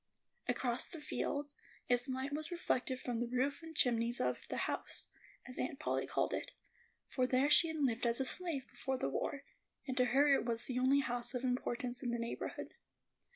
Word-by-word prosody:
Across 245 0 0
the 330 - -8
fields, 290 -1 -2 0.3
its 245 +1 +2
light 260 +2 -2
was 305 +1 -1
reflected 260 -7 0
from 245 -3 -2
the 240 - 0
roof 260 +6 0
and 325 -1 -9
chimneys 235 -2 +3
of - - -1
"The - - -2
House," - - -4 0.4
as 250 - -7
Aunt 260 +2 -1
Polly - - 0
called - - 0
it; - - -3 0.5
for 255 -1 0
there 265 +3 +3
she 330 - +8
had 320 -1 -3
lived 240 -2 +2
as 235 +2 +2
a 265 - +2
slave 320 -3 +1
before 265 -1 -2
the 135 - -1
war, 275 - -2 0.4
and 260 - -1
to 250 - +5
her 275 +4 +5
it - - +3
was 235 -1 0
the 250 -1 -2
only 270 +2 +5
house 245 -1 -2
of 250 - -2
importance 250 -1 -1
in 250 - -1
the 235 - 0
neighborhood. 235 0 -4
255 Hz, 200 wpm, -36 LUFS, 245-280 Hz, 0.5 s, she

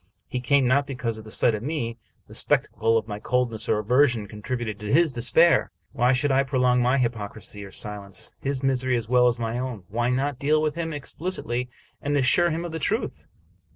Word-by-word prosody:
He 125 - -3
came 135 +2 +3
not 140 +3 +2
because 120 -5 -4
the 110 - -12
sight 115 +1 +2
of 105 - -3
me, 120 -4 -3 0.3
the - - -15
spectacle 115 0 +2
of 110 - -2
my 105 -1 -5
cold 125 +2 0
ness 110 - -3
or - - +3
aversion, 120 +1 +2
contributed 110 0 -4
to 105 -1 -4
his 155 -1 +4
despair. 160 +8 +4 0.2
Why 125 +1 +2
should 135 +2 +2
I 135 +1 +4
prolong, 125 -2 +2
by 125 +2 +3
hypocrisy 110 -4 -3
or 100 - -9
silence, 100 -1 -4
his 140 -1 -2
misery 130 -2 +1
as 115 -2 -4
well 125 +1 +4
as 120 0 +1
my 115 +1 -2
own? 125 -6 -4
Why 120 +4 0
not 135 +1 -1
deal 150 +3 +2
with 155 -1 0
him 165 0 -3
explicitly, 140 -5 -3 0.3
and 145 0 0
assure 145 +6 +4
him 165 +1 -2
of 170 - -5
the 160 - -4
truth? 215 - -2
125 Hz, 205 wpm, -25 LUFS, 115-140 Hz, 0.3 s, his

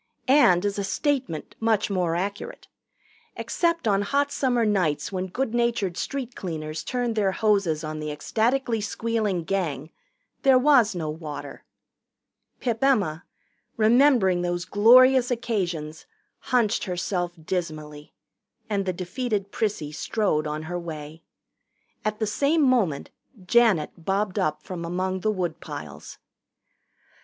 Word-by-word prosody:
And, 205 -10 +5
as 205 0 -1
a - - -1
statement, 260 - -2
much 220 -2 +1
more 180 -3 0
accurate. 200 +4 -4 0.7
Except 335 -5 -1
on 200 -1 +3
hot 280 +7 0
summer 245 -4 +1
nights 185 -8 0
when 185 -1 -3
good 240 +5 -3
natured 235 -7 0
street 255 +1 -4
cleaners 155 -3 -5
turned 245 -2 -2
their 200 -3 +1
hoses 195 -8 +1
on 155 0 -5
the 155 0 -4
ecstatically 225 - 0
squealing 215 -4 -1
Gang, 160 -6 -2 0.5
there 270 -2 +6
was 255 -6 +4
no 165 -3 -3
water. 150 -3 -8 0.9
Pip 235 -1 -2
Emma, 195 - +2 0.5
remembering 225 -5 +4
those 175 0 -2
glorious 250 +6 +6
occasions, 180 -11 -3 0.3
hunched 235 -4 +1
herself 180 -1 -2
dismally, 155 -3 -5 0.6
and 200 -3 -1
the 185 - 0
defeated 200 +2 -3
Prissy 200 -9 -2
strode 155 -1 -1
on 150 +1 -4
her 175 +2 -4
way. 160 -1 -8 0.8
At 215 0 -1
the 220 - -1
same 285 +9 +1
moment 220 - +1 0.3
Janet 215 -8 +3
bobbed 195 +2 -1
up 155 -5 -1
from 180 -2 -6
among 185 +2 -2
the 215 - 0
woodpiles. 155 - -6
195 Hz, 125 wpm, -25 LUFS, 165-235 Hz, 0.9 s, there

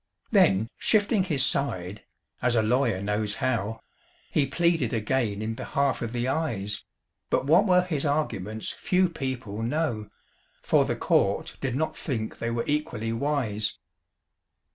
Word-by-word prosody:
Then 100 +3 +4
shifting 205 -2 +3
his 145 -7 +2
side 105 -8 -1 0.4
(as 125 -1 +2
a 110 - +3
lawyer 115 -4 +1
knows 105 0 0
how), 115 -5 -1 0.5
He 140 -3 +2
pleaded 165 -3 +1
again 110 -2 0
in 110 +1 -2
behalf 140 +4 -1
of 115 -2 -3
the 120 +1 -1
Eyes; 115 -9 -2 0.5
But - - +1
what 160 +8 +5
were 180 -1 +5
his 160 -6 -2
arguments 110 -8 -1
few 185 0 +1
people 130 -9 -4
know, 115 -4 -1 0.5
For - - +4
the - - -1
court - - +1
did 130 -2 -1
not 160 +3 -1
think 110 -7 -4
they 115 - -1
were 115 0 -1
equally 125 -7 -1
wise. 115 -6 -1
125 Hz, 140 wpm, -27 LUFS, 110-150 Hz, 0.5 s, what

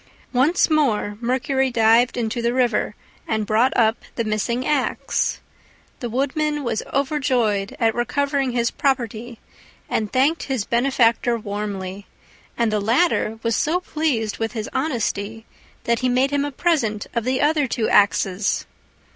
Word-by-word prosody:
Once 280 +8 +3
more 255 -10 +1
Mercury 265 +2 0
dived 235 +1 +3
into 235 0 -2
the 235 +1 0
river, 235 -4 +1 0.3
and 220 -1 -1
brought 225 +5 +3
up 220 -1 +3
the 230 - -1
missing 230 +4 -1
axe. 295 -3 0 0.6
The 240 - -4
Woodman 290 +4 -1
was 235 -3 -1
overjoyed 255 -8 0
at 225 -2 +2
recovering 275 +2 0
his 235 -1 +1
property, 240 -3 -2 0.5
and 215 -2 -2
thanked 280 +6 +2
his 255 -6 -1
benefactor 235 -1 +2
warmly; 200 -2 -5 0.5
and 235 -2 +1
the 210 - +2
latter 225 - +1
was 230 -1 +1
so 320 +10 +1
pleased 290 - -2
with 225 0 -2
his 220 -2 -4
honesty 225 -6 -2 0.4
that 235 0 +1
he 255 - +1
made 260 +3 +2
him 285 0 +1
a 290 - -4
present 255 -10 0
of 235 -2 -1
the 255 +2 0
other 295 -1 +2
two 235 -2 -1
axes. 200 -1 +2
240 Hz, 145 wpm, -22 LUFS, 220-270 Hz, 0.6 s, Once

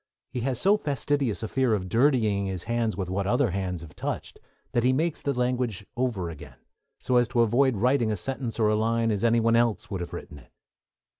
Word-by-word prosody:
He 125 - -3
has 125 0 -1
so 200 +7 +4
fastidious 140 - -1
a - - -1
fear 130 -1 +1
of 95 -3 -4
dirtying 110 -4 +2
his 95 -2 -3
hands 115 -4 -1
with 95 -3 -2
what 95 +1 -2
other 120 0 +2
hands 90 -2 -3
have 80 -2 -12
touched - - -5 0.3
that 120 - +1
he 130 - +4
makes 160 +4 0
the 140 - 0
language 125 -5 -1
over 120 -8 -1
again, 80 - -11 0.4
so 125 - +1
as 120 -1 +4
to 120 0 +1
avoid 125 +3 +3
writing 120 +1 +2
a 105 - -1
sentence 130 +3 -4
or 110 -2 +3
a 105 - +2
line 115 +1 +1
as 105 0 -1
any 115 0 +4
one 115 0 +3
else 115 -2 +2
could 100 -3 -5
have 85 - -5
written 75 - -8
it. 60 - -20
115 Hz, 220 wpm, -26 LUFS, 100-125 Hz, 0.4 s, so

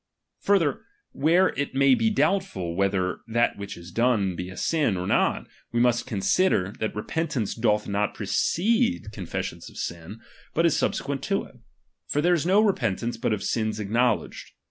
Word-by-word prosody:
Further, 170 -9 +2 0.3
where 170 +6 +3
it 140 0 -4
may 135 0 +5
be 225 - +2
doubtful 190 - 0
whether 95 -1 0
that 120 +1 +1
which 100 0 -6
is 85 +1 -11
done 110 -5 +1
be 90 +1 -5
a 95 - -10
sin 150 - +1
or 90 - -3
not, - - +1 0.3
we 120 - 0
must 120 0 +2
consider, 105 - +1
that 110 - -2
repentance 120 0 -2
doth 105 -2 +1
not 100 +1 -1
precede 230 - +1
confession 95 -6 -5
of - - -12
sins, 85 +5 -6 0.4
but 165 - +3
is 165 - +3
subsequent 140 -1 -1
to 195 - 0
it: 125 - -16 0.5
for 145 - -1
there 175 +4 +3
is 170 -1 0
no 195 +3 +5
repentance 120 - 0
but 115 - -1
of 105 -2 -1
sins 110 -2 -1
acknow 115 +3 +2
ledged. - - -11
120 Hz, 170 wpm, -25 LUFS, 100-160 Hz, 0.5 s, may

